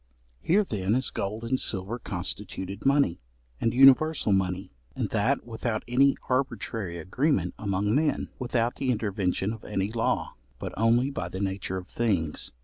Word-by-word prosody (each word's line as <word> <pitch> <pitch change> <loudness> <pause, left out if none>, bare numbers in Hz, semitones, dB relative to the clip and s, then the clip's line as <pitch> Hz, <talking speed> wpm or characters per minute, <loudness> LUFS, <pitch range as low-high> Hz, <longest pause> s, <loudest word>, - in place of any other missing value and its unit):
Here 200 +5 +3
then 105 - -1
is 130 0 0
gold 105 +3 -3
and 130 +3 0
silver 100 +4 -3
constituted 95 +2 -4
money, 140 -11 +3 0.4
and 115 - +1
universal 135 -1 +6
money, 95 0 0 0.2
and - - -2
that 115 +6 +1
without 115 -1 -3
any 135 +3 +4
arbitrary 115 -8 -2
agreement 95 - 0
among 100 0 0
men, 150 +3 +1
without 120 -1 0
the 135 - -1
intervention 100 -3 0
of 110 - -10
any 100 0 -2
law, 115 0 0 0.2
but - - -6
only 120 +5 +3
by 90 -10 -4
the 95 - -5
nature 95 -1 -2
of 90 0 -7
things. 95 -11 -1
110 Hz, 150 wpm, -27 LUFS, 95-125 Hz, 0.4 s, universal